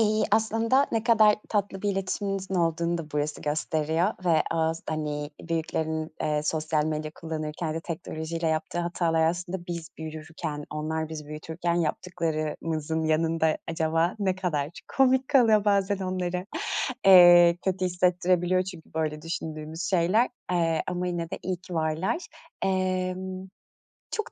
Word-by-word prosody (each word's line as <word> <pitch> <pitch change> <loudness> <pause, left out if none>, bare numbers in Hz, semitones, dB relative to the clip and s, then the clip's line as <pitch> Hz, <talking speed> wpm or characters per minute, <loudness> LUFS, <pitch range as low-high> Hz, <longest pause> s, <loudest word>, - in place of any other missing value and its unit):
İii, 215 0 +3
aslında 225 +5 +3
ne 225 -1 +1
kadar 215 -3 +6
tatlı 200 -2 -1
bir 205 - +1
iletişiminizin 195 0 -2
olduğunu 170 0 +1
da 155 -2 -7
burası 150 0 -2
gösteriyor. 155 +3 0 0.2
Ve 165 -3 +4
az 160 0 0
hani, 150 -1 -3
büyüklerin, 160 -1 -2
ııı, 150 0 0
sosyal 155 0 0
medya 155 0 -2
kullanırken 155 0 -4
de 165 - -2
teknolojiyle 165 0 -4
yaptığı 160 +2 -1
hatalar 165 -2 +1
aslında 175 +1 -3
biz 170 -2 -5
büyürken, 155 -1 -6
onlar 155 +1 -2
bizi 155 -2 -7
büyütürken 160 +3 -3
yaptıklarımızın 160 -1 -2
yanında 160 0 +2
acaba 165 +1 +1
ne 190 -3 +1
kadar 155 -6 -1 0.3
komik 260 -1 +4
kalıyor? 225 -7 +5
Bazen 200 -1 +2
onlara, 185 -1 -2 0.6
eee, 175 -2 +9
kötü 185 -1 0
hissettirebiliyor 180 0 +2
çünkü 175 -4 -10
böyle 155 -1 -2
düşündüğümüz 160 0 -5
şeyler. 190 +7 +3 0.2
Eee, 165 -2 +1
ama 180 0 -2
yine 170 0 -3
de - - -4
iyi 185 -1 -2
ki 180 0 -10
varlar. 160 - 0 0.5
Emm, 185 0 -1 0.6
çok 435 - -3
170 Hz, 135 wpm, -27 LUFS, 160-185 Hz, 0.6 s, eee